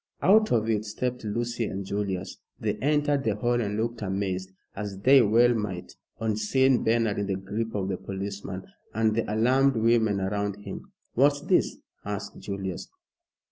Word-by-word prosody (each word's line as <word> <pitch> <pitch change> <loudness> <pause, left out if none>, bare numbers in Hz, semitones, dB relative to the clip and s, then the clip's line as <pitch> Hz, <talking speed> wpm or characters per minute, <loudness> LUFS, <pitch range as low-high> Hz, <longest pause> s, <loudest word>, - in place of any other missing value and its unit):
Out 215 +3 +5
of 110 -2 +2
it 110 -2 +1
stepped 125 +4 -3
Lucy 120 +2 -1
and 95 -1 -4
Julius. 95 -2 -3 0.2
They 105 -2 0
entered 145 +2 +1
the 110 -2 +1
hall 120 +3 +1
and 105 -2 -2
looked 115 +1 -2
amazed, 95 -1 -2 0.2
as 100 -1 -5
they 130 +7 +6
well 120 +3 +5
might, 105 -6 -4 0.2
on 110 -2 0
seeing 130 +4 +3
Bernard 115 -2 +2
in 100 - -1
the 100 - 0
grip 105 +4 -4
of 95 -2 -1
the 95 -2 -2
policeman, 100 -1 -5 0.3
and 110 0 +2
the 110 -1 -1
alarmed 130 +5 +3
women 110 -2 +3
around 100 +1 -1
him. 100 -2 -8 0.2
"What's 140 +3 +3
this?" - - +2 0.3
asked 100 0 -5
Julius. 95 -3 -5
105 Hz, 165 wpm, -27 LUFS, 100-120 Hz, 0.3 s, they